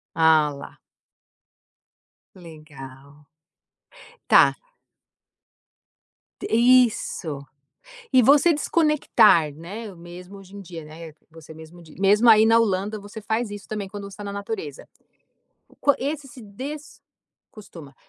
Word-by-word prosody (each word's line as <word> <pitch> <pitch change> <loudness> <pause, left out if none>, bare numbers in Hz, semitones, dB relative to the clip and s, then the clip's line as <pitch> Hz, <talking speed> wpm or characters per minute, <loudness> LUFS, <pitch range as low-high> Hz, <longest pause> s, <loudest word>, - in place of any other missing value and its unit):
Ah 160 -2 +4
lá. 140 - -12 1.6
Legal. 150 -4 -14 1.0
Tá. - - +5 1.8
T - - -6
isso. 225 - +1 0.7
E 255 - +5
você 290 +7 +5
desconectar, 290 - +2
né, 200 +7 -9
mesmo 180 +3 -12
hoje 195 +1 -14
em - - -9
dia, 170 -4 -10
né, 160 +1 -11 0.2
você 160 -1 -14
mesmo 160 +2 -14
dis 155 -2 -17
mesmo 205 +4 +3
aí 220 -1 +6
na 225 +1 +4
Holanda, 210 0 -1
você 205 +2 -11
faz 220 +1 -3
isso 205 -1 -9
também, 210 -2 -5
quando 205 +1 -9
você 195 - -14
tá 205 - -8
na 200 - -6
natureza. 400 - -7 0.8
O - - -24
quan 285 - +2
esse 290 +1 -4
se 250 -2 -13
des 270 +9 -9 0.5
costuma. 165 -9 -14
200 Hz, 125 wpm, -23 LUFS, 160-230 Hz, 1.8 s, aí